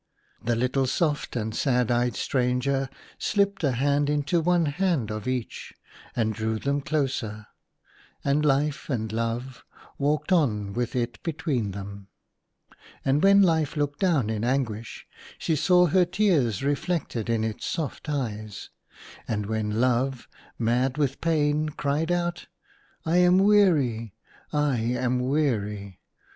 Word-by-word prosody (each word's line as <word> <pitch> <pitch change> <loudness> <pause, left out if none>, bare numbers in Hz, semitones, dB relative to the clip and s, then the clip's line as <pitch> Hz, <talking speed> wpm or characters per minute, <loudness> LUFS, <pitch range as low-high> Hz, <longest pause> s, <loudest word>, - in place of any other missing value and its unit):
The 120 0 +1
little 130 +3 +1
soft 150 +1 -1
and 110 -2 -2
sad 125 -1 +1
eyed 120 -2 +1
stranger 130 +4 0 0.3
slipped 200 -2 0
a 140 -3 +2
hand 140 +3 +1
into 150 +4 +1
one 175 0 +2
hand 150 - 0
of 110 +1 -5
each, 130 -2 -4 0.4
and 110 -2 +1
drew 110 +1 -2
them 140 +5 -1
closer, 135 -8 -2 0.8
and 140 +2 +2
Life 145 +1 +1
and 110 -5 -2
Love 115 +3 -3 0.4
walked 150 +6 0
on 105 - +2
with 120 +3 -2
it 120 -2 -2
between 150 -9 -2
them. 100 0 -8 1.0
And 135 +2 +2
when 200 0 +6
Life 160 -4 +1
looked 145 -1 -1
down 155 - +2
in 110 0 -2
anguish, 120 -3 -2 0.3
she 160 - 0
saw 180 +4 +4
her 180 +3 +4
tears 170 - +1
reflected 145 - -1
in 115 -1 +1
its 110 -1 -3
soft 160 -1 -4
eyes. 110 -8 -4 0.6
And 105 -2 -2
when 110 0 -2
Love, 125 +1 +1 0.3
mad 125 +4 +1
with 140 -3 -1
pain, 155 -2 +1
cried 150 +3 -1
out, 175 0 -1 0.3
" - - -35
I 165 +2 +2
am 180 0 +5
weary, 160 - +3 0.4
I 150 -3 +1
am 125 +2 0
weary 105 - -1
135 Hz, 135 wpm, -26 LUFS, 115-155 Hz, 1.0 s, when